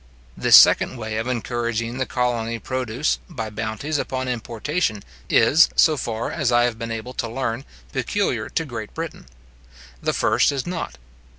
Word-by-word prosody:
This - - +6
second - - +7
way 110 -1 -4
of 115 +2 -2
encouraging 120 -1 -2
the 130 - -1
colony 120 -2 -1
produce, 130 +3 -1
by 115 -10 -5
bounties 110 +8 -3
upon 130 0 -3
importation, 120 - -2 0.3
is, 160 +3 +5
so 155 - +5
far 115 -4 -3
as 145 -7 0
I 120 0 +4
have 120 -2 -1
been 115 +1 -4
able 115 +2 -5
to 120 -2 -3
learn, 125 +1 -3 0.3
peculiar 140 - -1
to 165 - -1
Great 115 -6 -7
Britain: 165 - -6 0.7
the - - 0
first - - +3
is 140 -2 -3
not. 175 - -4
120 Hz, 160 wpm, -22 LUFS, 115-135 Hz, 0.7 s, second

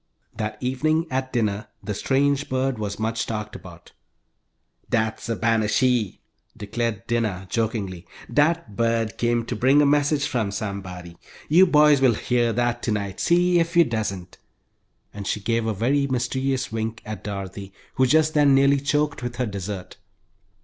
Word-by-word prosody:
That 105 0 -4
evening, 155 +6 +1
at 130 0 -2
dinner, 105 -3 -1 0.2
the 105 +1 -3
strange 140 +5 +1
bird 130 -2 -1
was 100 -1 -3
much 110 +1 -2
talked 105 -1 -4
about. 85 -1 -12 1.0
"Dat's 110 +1 -1
a 115 - 0
ban 115 -1 +1
shee!" 120 -3 +1 0.4
declared 110 0 -3
Dinah, 105 -6 -1
jokingly. 105 -6 -2 0.3
"Dat 150 -7 +1
bird 115 -1 0
came 120 -1 +1
to - - -4
bring 135 +3 +4
a 145 - +5
message 145 0 +2
from 115 -5 -1
somebody. 95 -4 -6 0.3
You 180 +5 +6
boys 150 -3 +5
will 125 -4 +4
hear 120 0 +1
dat 120 +1 0
tonight, 100 -4 -2
see 175 0 +3
if 170 +1 0
you 170 - +8
doesn't," 100 - -4 0.7
and 100 -1 -7
she - - -1
gave 115 +2 -1
a - - +1
very 135 +7 +1
mysterious 130 0 -1
wink 110 0 -4
at 110 0 -7
Dorothy, 100 -1 -6 0.2
who 130 0 +3
just 155 +3 +3
then 145 -3 +5
nearly 140 +1 +4
choked 145 0 0
with 120 -1 -4
her 125 +1 -1
dessert. 100 -2 -6
115 Hz, 155 wpm, -23 LUFS, 105-135 Hz, 1.0 s, you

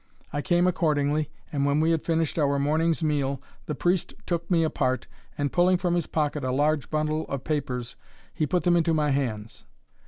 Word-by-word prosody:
I 145 - -1
came 175 +3 +2
accordingly, 150 -4 +1 0.2
and 140 -2 0
when 140 +1 +2
we 160 +1 +3
had 165 -2 +1
finished 165 -1 0
our 140 -1 +2
morning's 160 +4 +1
meal, 140 -3 0 0.3
the 150 - -2
priest 175 +4 0
took 170 -1 -2
me 170 -3 +3
apart, 130 -5 0 0.3
and 145 -1 -1
pulling 180 +1 +4
from 175 -1 0
his 175 -2 0
pocket 150 -2 -1
a 130 - 0
large 145 +2 +1
bundle 155 0 -1
of 140 -2 -4
papers, 130 -5 -3 0.4
he 155 - 0
put 180 +4 +1
them 175 -1 +4
into 165 -1 +2
my 150 -2 +2
hands. 115 -6 -2
155 Hz, 190 wpm, -26 LUFS, 140-165 Hz, 0.4 s, pulling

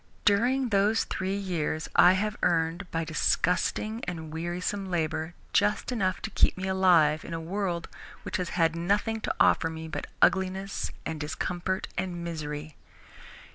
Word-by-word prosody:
During 245 +6 +3
those 210 +2 +3
three 190 +1 -2
years 170 -5 -2
I 180 - +8
have 210 +3 -1
earned, 170 +2 +1
by 165 0 -1
disgusting 180 +7 0
and 160 -3 -5
wearisome 180 +4 -3
labour, 160 -1 -2 0.2
just 210 +4 +2
enough 190 -6 -1
to 220 - -4
keep - - +3
me 190 +1 -3
alive 175 -5 +4
in 165 - -5
a - - -3
world 175 0 -2 0.4
which - - -2
has 180 -2 -3
had 165 -1 +3
nothing 205 +6 0
to - - -2
offer 165 - +4
me 160 0 -6
but 160 - -5
ugliness 190 +1 +1 0.2
and 160 -1 -3
discomfort 175 +5 -2
and 180 -2 -3
misery. 155 -2 -5
180 Hz, 150 wpm, -28 LUFS, 165-195 Hz, 0.4 s, I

